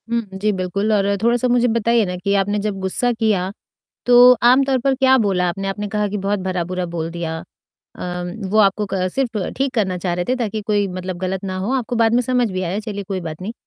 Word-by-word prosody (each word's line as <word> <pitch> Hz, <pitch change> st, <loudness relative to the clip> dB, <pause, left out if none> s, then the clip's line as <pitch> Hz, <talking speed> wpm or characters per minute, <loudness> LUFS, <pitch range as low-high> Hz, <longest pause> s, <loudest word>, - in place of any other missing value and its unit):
हुँ, 235 Hz, 0 st, +1 dB
जी, 205 Hz, +2 st, 0 dB
बिल्कुल। 200 Hz, +2 st, -1 dB
और 200 Hz, -1 st, +2 dB
थोड़ा-सा 240 Hz, +1 st, +2 dB
मुझे 245 Hz, 0 st, +3 dB
बताइए 230 Hz, 0 st, +2 dB
ना 180 Hz, -1 st, -4 dB
कि 200 Hz, +3 st, -1 dB
आपने 205 Hz, +1 st, +1 dB
जब 205 Hz, -1 st, -3 dB
गुस्सा 190 Hz, +6 st, 0 dB
किया, 210 Hz, -5 st, 0 dB, 0.6 s
तो 245 Hz, +1 st, +8 dB
आमतौर 260 Hz, +2 st, +4 dB
पर 275 Hz, -1 st, +3 dB
क्या 265 Hz, 0 st, +4 dB
बोला 190 Hz, -5 st, +1 dB
आपने? 195 Hz, +3 st, -3 dB
आपने 205 Hz, +1 st, -3 dB
कहा 210 Hz, 0 st, -1 dB
कि 205 Hz, -, -3 dB
बहुत 200 Hz, +1 st, -1 dB
भला-बुरा 185 Hz, -1 st, -2 dB
बोल 165 Hz, -1 st, -4 dB
दिया। 165 Hz, -1 st, -4 dB, 0.4 s
अ, 180 Hz, 0 st, -7 dB, 0.3 s
वो 215 Hz, -, +2 dB
आपको 210 Hz, 0 st, +3 dB
क 185 Hz, -1 st, 0 dB
सिर्फ़ 245 Hz, -5 st, -1 dB, 0.2 s
ठीक 270 Hz, 0 st, -1 dB
करना 195 Hz, -6 st, 0 dB
चाह 175 Hz, 0 st, -2 dB
रहे 175 Hz, 0 st, -2 dB
थे 255 Hz, -, +2 dB
ताकि 220 Hz, -3 st, -2 dB
कोई 205 Hz, -2 st, +1 dB
मतलब 185 Hz, 0 st, -5 dB
गलत 190 Hz, +1 st, -3 dB
ना 185 Hz, -1 st, -3 dB
हो, 195 Hz, +7 st, -2 dB
आपको 245 Hz, -2 st, -2 dB
बाद 225 Hz, 0 st, +3 dB
में 245 Hz, -, +3 dB
समझ 245 Hz, -2 st, +1 dB
भी 185 Hz, 0 st, -3 dB
आया, 180 Hz, +3 st, -2 dB
चलिए 205 Hz, -2 st, -5 dB
कोई 190 Hz, -2 st, -2 dB
बात 160 Hz, -2 st, -7 dB
नहीं। 210 Hz, +4 st, -4 dB
205 Hz, 230 wpm, -20 LUFS, 185-235 Hz, 0.6 s, तो